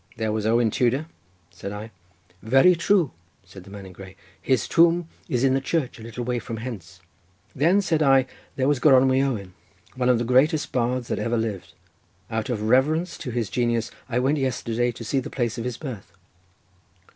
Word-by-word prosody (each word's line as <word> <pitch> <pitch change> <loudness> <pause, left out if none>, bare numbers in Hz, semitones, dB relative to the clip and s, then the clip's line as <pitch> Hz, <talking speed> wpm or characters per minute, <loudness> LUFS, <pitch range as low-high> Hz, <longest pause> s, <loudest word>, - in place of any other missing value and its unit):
"There 110 -1 -1
was 110 0 -1
Owen 115 0 +3
Tudor?" 130 +7 +1 0.5
said 95 +3 -7
I. 105 +2 -7 0.5
"Very 135 +11 +5
true," 175 -2 +2 0.3
said 95 0 -14
the - - -13
man 100 -1 -9
in 95 - -11
grey, 95 0 -12 0.3
"his 130 -5 +1
tomb 170 0 +3 0.2
is 125 0 0
in 135 -1 +4
the 135 - +1
church 135 -3 -2
a - - -11
little 115 +2 -6
way 125 0 -1
from 115 -1 -6
hence." 95 -7 -8 0.5
"Then," 175 +8 +3
said 160 -4 0
I, 135 -3 +5 0.3
"there 130 0 0
was 145 -3 +2
Gronwy 130 -1 +5
Owen, 105 -9 -2 0.4
one 125 -1 0
of 125 - +4
the 120 - -1
greatest 140 +6 +2
bards 125 0 -1
that - - -1
ever 115 0 -1
lived. 110 -4 -4 0.6
Out 110 +1 -2
of 110 -4 -2
reverence 150 +10 +2
to - - -5
his 115 -6 -3
genius 120 -2 0 0.2
I 120 - -1
went 135 +4 +1
yesterday 120 -2 -1
to 115 - -9
see 135 +5 0
the 130 - -6
place 120 -2 -2
of 115 - -4
his 125 -2 -3
birth." 125 -10 -8
125 Hz, 190 wpm, -24 LUFS, 110-135 Hz, 0.6 s, Very